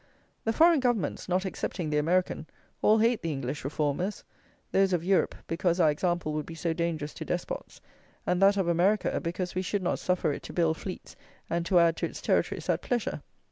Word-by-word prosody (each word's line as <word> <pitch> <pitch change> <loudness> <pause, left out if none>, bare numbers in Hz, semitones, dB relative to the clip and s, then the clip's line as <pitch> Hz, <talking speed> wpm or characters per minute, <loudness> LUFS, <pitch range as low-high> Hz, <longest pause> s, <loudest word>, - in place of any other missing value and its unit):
The 225 - +2
foreign 330 +5 +5
governments 235 - -1
(not 185 +2 +1
excepting 175 -3 -3
the 150 - +2
American) 170 0 0 0.3
all 215 - +5
hate 230 +1 +2
the 165 - -2
English 135 0 -4
Reformers; 150 +7 -1 0.5
those 195 -1 +3
of 170 -2 +1
Europe, 190 +1 +2
because 170 +1 0
our 160 -3 +5
example 175 0 -1
would 150 -1 -3
be 165 - -7
so 165 0 -1
dangerous 160 -3 -2
to - - -6
despots; - - -4 0.4
and 180 +1 +1
that 200 +1 +6
of 190 -3 +1
America, 180 +5 +2
because 180 +1 -3
we 185 - -1
should 195 +1 -2
not 180 - 0
suffer 180 -4 0
it - - -6
to - - -9
build 160 -2 +2
fleets 185 - -7 0.4
and 170 0 0
to 185 - +3
add 170 -1 +4
to - - -1
its - - -9
territories - - 0
at - - +1
pleasure. 240 -3 -2
175 Hz, 200 wpm, -28 LUFS, 160-195 Hz, 0.5 s, that